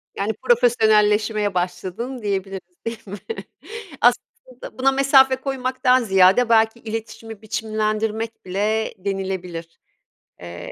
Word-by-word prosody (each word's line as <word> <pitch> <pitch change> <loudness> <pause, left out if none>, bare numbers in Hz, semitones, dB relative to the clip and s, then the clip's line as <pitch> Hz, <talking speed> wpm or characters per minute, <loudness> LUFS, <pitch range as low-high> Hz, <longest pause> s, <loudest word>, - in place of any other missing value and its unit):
Yani, 205 +3 -1
profesyonelleşmeye 215 -3 +2
başladın, 190 +8 -4
diyebiliriz, 195 - -4
değil 230 -1 -4
mi? 200 +2 -7 0.8
Aslında 245 +1 -1
buna 270 +1 +4
mesafe 270 -1 +5
koymaktan 255 -1 0
ziyade, 195 +3 +4
belki 225 0 +3
iletişimi 225 -1 -7
biçimlendirmek 215 +1 -3
bile 210 +4 -1
denilebilir, 185 -3 -5 0.6
eee, 85 0 -8
220 Hz, 95 wpm, -21 LUFS, 195-245 Hz, 0.8 s, mesafe